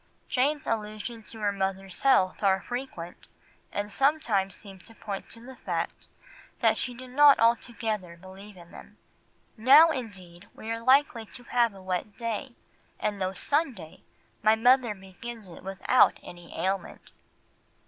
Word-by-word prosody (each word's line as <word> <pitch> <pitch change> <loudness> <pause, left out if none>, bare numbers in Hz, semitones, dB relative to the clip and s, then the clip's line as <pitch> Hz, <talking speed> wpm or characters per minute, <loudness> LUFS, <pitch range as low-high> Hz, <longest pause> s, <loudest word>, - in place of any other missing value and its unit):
Jane's 285 +3 +1
allusions 215 +1 -4
to 225 - -10
her 205 -1 +2
mother's 195 -1 -3
health 190 -9 +3
are 195 -2 +3
frequent, 245 -9 -7 0.4
and 205 +1 -4
sometimes 240 -10 +1
seem 195 -2 -12
to 225 +5 -12
point 200 -3 -6
to 230 - -11
the 255 +2 -12
fact - - -4 0.5
that - - +3
she 250 -1 -3
did 255 +1 -10
not 290 +1 +7
altogether 225 -6 0
believe 190 +3 -13
in 170 -1 -15
them— - - -13 0.6
"Now 285 +9 +7
indeed 190 - -7
we 220 - -6
are 230 0 -3
likely 255 -3 +3
to 245 - -10
have 235 -3 +1
a 190 - -13
wet 185 +2 -3
day, 230 +1 -4 0.4
and 205 -2 -2
though 185 0 -1
Sunday, 250 - -2 0.4
my 215 +1 +5
mother 245 -1 +3
begins 195 +3 -10
it 170 - -12
without 195 +6 +3
any 175 -1 -11
ailment." 195 +1 -3
215 Hz, 150 wpm, -27 LUFS, 190-245 Hz, 0.6 s, not